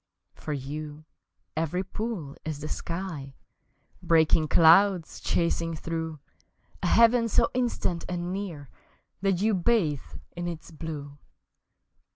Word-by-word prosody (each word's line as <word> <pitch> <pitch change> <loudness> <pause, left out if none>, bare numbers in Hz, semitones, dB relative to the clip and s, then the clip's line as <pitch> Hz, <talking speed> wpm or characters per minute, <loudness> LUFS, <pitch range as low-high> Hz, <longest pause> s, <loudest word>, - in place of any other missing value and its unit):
For 155 - -7
you 150 +2 -5 0.5
every 165 +4 -1
pool 190 -7 -5
is 155 -2 -4
the 150 - -5
sky, 165 -6 -5 0.7
Breaking 160 -1 +4
clouds 170 +3 +5
chasing 170 -1 0
through, 160 -1 -4 0.6
A - - 0
heaven 230 0 +5
so - - +3
instant 235 -8 -1
and 175 0 -3
near 170 -9 -5 0.5
That 195 -1 +1
you 220 0 +3
bathe 180 - +1 0.2
in 175 0 -3
its 170 -1 -6
blue! 145 -3 -7
165 Hz, 115 wpm, -27 LUFS, 155-190 Hz, 0.7 s, clouds